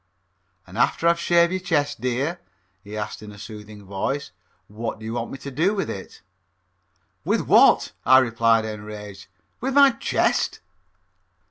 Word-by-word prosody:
"An' 95 +3 -11
after 135 +6 +2
I've 170 0 +3
shaved 170 0 +3
your 185 - -1
chest, 150 -9 -1
dear," 135 +8 -1 0.4
he 105 +1 -8
asked 105 - -5
in 105 -1 -10
a 105 - -13
soothing 105 -1 -10
voice, 100 +9 -3 0.4
"what 110 +2 -5
do 110 - -11
you 110 - -4
want 120 -1 -3
me - - -7
to 140 +1 -8
do 170 +10 +1
with 195 -6 -2
it?" 95 - -9 1.0
"With - - +1
what?" - - +5
I 130 - +7
replied, 115 -3 +3
enraged, 105 -2 -8 0.3
"with 265 +2 -2
my 280 -1 +7
chest?" 230 - 0
120 Hz, 155 wpm, -23 LUFS, 105-165 Hz, 1.0 s, I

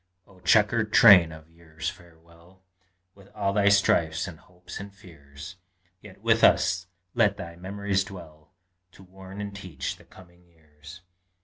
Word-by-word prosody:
Oh, 95 -2 -21
chequered 105 +3 +2
train 95 -9 +7
of 80 0 -13
years, 80 -1 -9
farewell! 85 +1 -12 0.5
With 100 -1 -19
all 100 -1 -1
thy 100 0 +3
strifes 85 -4 +2
and 85 -3 -10
hopes 90 0 -12
and 100 0 -9
fears! 80 -4 -13 0.4
Yet - - -15
with - - +2
us 90 +1 +3 0.3
let 105 -4 +2
thy 85 -2 -9
memories 95 +2 -2
dwell, 85 -6 -13 0.4
To 95 - -16
warn 95 +1 -13
and 100 -1 -6
teach 90 -9 -6
the - - -19
coming 90 -1 -19
years. 80 +1 -16
90 Hz, 145 wpm, -25 LUFS, 80-100 Hz, 0.5 s, train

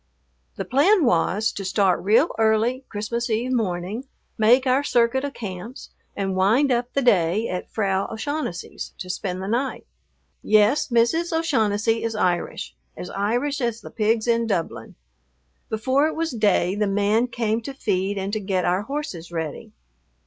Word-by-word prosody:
The - - -4
plan 325 +6 +4
was, 210 +2 +2
to 200 - -6
start 190 -1 +2
real 220 - +4
early 225 +4 +2
Christmas 235 +3 -3
Eve 230 +3 0
morning, 205 +1 -2 0.3
make 245 +4 +4
our 260 +2 +2
circuit 245 0 +2
of 285 -1 -4
camps, 210 +3 -7 0.2
and 195 -1 -2
wind 225 +9 +3
up 240 0 0
the 275 - +1
day 200 -1 +3
at 180 - -4
Frau 195 -3 0
O'Shaughnessy's 255 - -4
to 185 - -5
spend 185 0 -4
the - - -4
night. 245 +5 -2 0.6
Yes, 215 +6 +3
Mrs. 255 +8 +2
O'Shaughnessy 225 -9 +1
is 225 -1 -2
Irish, 180 - -1 0.2
as 180 - -7
Irish 245 +8 -1
as 235 -2 -1
the - - -10
pigs 220 +1 +1
in 230 -1 +2
Dublin. 170 -6 -3 0.7
Before 260 +7 +2
it 315 - -4
was 325 0 -1
day 205 -5 +2
the 210 +1 0
man 205 +4 +2
came 230 -2 -1
to 255 - -6
feed 200 -6 -1
and 195 +1 -3
to 215 - 0
get 190 -2 -1
our 180 +2 +1
horses 225 - -5
ready. 160 -3 -5
220 Hz, 160 wpm, -23 LUFS, 195-250 Hz, 0.7 s, plan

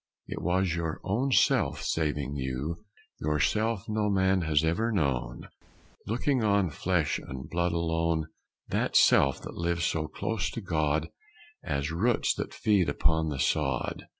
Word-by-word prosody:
It - - -6
was 90 0 +1
your 80 -2 -3
own 125 +8 0
Self - - +3
saving 75 -3 -1
you, 70 +5 -3 0.4
Your 75 0 0
Self 110 +4 0
no 105 -1 0
man 95 -1 +2
has 80 -2 +2
ever 95 +9 +1
known, 65 - -1 0.6
Looking 125 +3 0
on 100 -5 +2
flesh 85 +1 0
and 65 -1 -8
blood 85 0 0
alone. 80 -1 0 0.4
That - - +1
Self 70 -2 +5
that - - -7
lives 85 0 -1
so 80 -1 -1
close 110 +4 -2
to 115 - -6
God 80 -4 0 0.5
As 70 +2 -2
roots 110 +9 +1
that - - -5
feed 100 -7 +2
upon 80 +2 +1
the 75 - -3
sod. - - -1
85 Hz, 150 wpm, -28 LUFS, 75-100 Hz, 0.6 s, Self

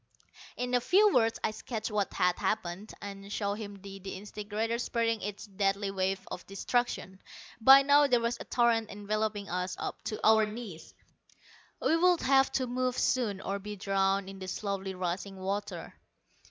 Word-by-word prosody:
In 250 0 -2
a 245 - +4
few 405 - +5
words 225 -2 +3
I - - +1
sketched 220 +1 -5
what 205 -2 0
had 180 0 +2
happened, 200 -1 -2
and 200 0 -8
showed 200 -1 -1
him 205 -2 -6
the 195 0 -9
disintegrator 210 +4 -4
spreading 230 -2 0
its 205 +2 -5
deadly 195 0 0
waves 190 0 -1
of 180 - -5
destruction. 195 -2 -2 0.4
By 270 +4 +9
now 285 +1 +6
there 250 -3 +4
was 235 +1 -1
a - - -7
torrent 235 -2 +2
enveloping 210 0 -2
us 180 +1 -2
up - - -5
to 215 - -3
our 220 -1 +6
knees. 210 -7 -8 0.8
We 325 - +2
would 355 0 +4
have 270 0 +4
to 260 - +1
move 255 0 -1
soon, 215 -7 +1
or 195 +1 -3
be 210 +1 -6
drowned 195 0 +1
in 195 0 -9
the 185 - -6
slowly 195 0 -3
rising 185 +2 -3
water. 200 +2 -4
210 Hz, 165 wpm, -30 LUFS, 195-235 Hz, 0.8 s, By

